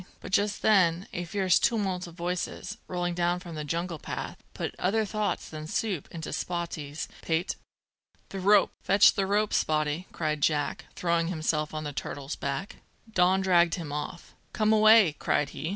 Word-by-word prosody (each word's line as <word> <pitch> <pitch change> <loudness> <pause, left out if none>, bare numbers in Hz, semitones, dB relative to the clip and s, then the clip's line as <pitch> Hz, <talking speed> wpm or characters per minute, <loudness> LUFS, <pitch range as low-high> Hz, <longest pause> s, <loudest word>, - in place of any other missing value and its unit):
But - - -9
just 205 +1 +1
then 185 -4 +4
a 175 0 -3
fierce 185 0 +2
tumult 195 -6 0
of 170 - -12
voices, 180 +4 -4
rolling 175 -1 -2
down 175 0 +1
from 175 -2 -9
the 155 -1 -4
jungle 165 +2 -3
path, - - -6
put - - -3
other 215 +4 +1
thoughts 210 0 -2
than 155 -1 -7
soup 190 -3 -2
into 165 -1 -6
Spottie's 165 -4 -4
pate. 165 +2 -1 0.7
"The 195 - -5
rope! 200 +2 +5
Fetch 200 +2 +6
the 195 -2 0
rope, 210 +1 +1
Spottie!" 155 +3 0
cried 155 -2 -2
Jack, 145 -1 0
throwing 170 -1 +1
himself 155 -3 -1
on 155 0 -4
the 145 -1 -5
turtle's 140 +1 -5
back. 140 +8 -4 0.4
Don 185 0 +4
dragged 175 -3 +4
him 165 -6 -6
off. 150 +4 -6 0.2
"Come 215 0 +2
away!" 215 -7 +6
cried 145 - +1
he. 155 - -5
175 Hz, 170 wpm, -28 LUFS, 155-195 Hz, 0.7 s, Fetch